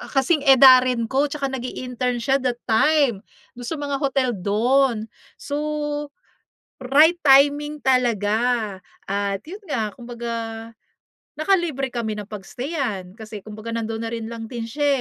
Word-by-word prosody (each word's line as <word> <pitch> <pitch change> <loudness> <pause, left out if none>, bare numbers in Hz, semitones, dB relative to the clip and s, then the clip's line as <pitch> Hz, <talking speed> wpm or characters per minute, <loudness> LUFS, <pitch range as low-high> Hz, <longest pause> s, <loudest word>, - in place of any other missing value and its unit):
kasing 270 +4 +3
edarin 255 -2 +7
ko 275 +2 +2
'tsaka 280 -2 -3
nag-i-intern 250 -1 -3
siya 270 +3 +1
that 250 -2 -1
time 255 0 +3 0.4
do'n 245 - -7
sa 320 - -2
mga 285 -2 -3
hotel 270 -2 +1
do'n. 230 +4 +1 0.3
So, 285 - -6 1.2
right 295 +7 +4
timing 290 +2 +4
talaga 230 -3 +1 0.3
at 200 -1 -1
'yun 390 +5 -11
nga, 225 - -2
kumbaga, 235 -1 -6 1.1
naka 315 +6 +3
libre 275 -6 -3
kami 230 -3 -3
ng 210 0 -8
pag-stayan 215 - -4
kasi 215 -1 -10
kumbaga 215 +2 -7
nandoon 225 -1 -3
na - - -6
rin 225 -1 -5
lang 225 -1 -7
din 235 -1 -5
siya, 290 +6 -2
250 Hz, 135 wpm, -22 LUFS, 225-275 Hz, 1.2 s, edarin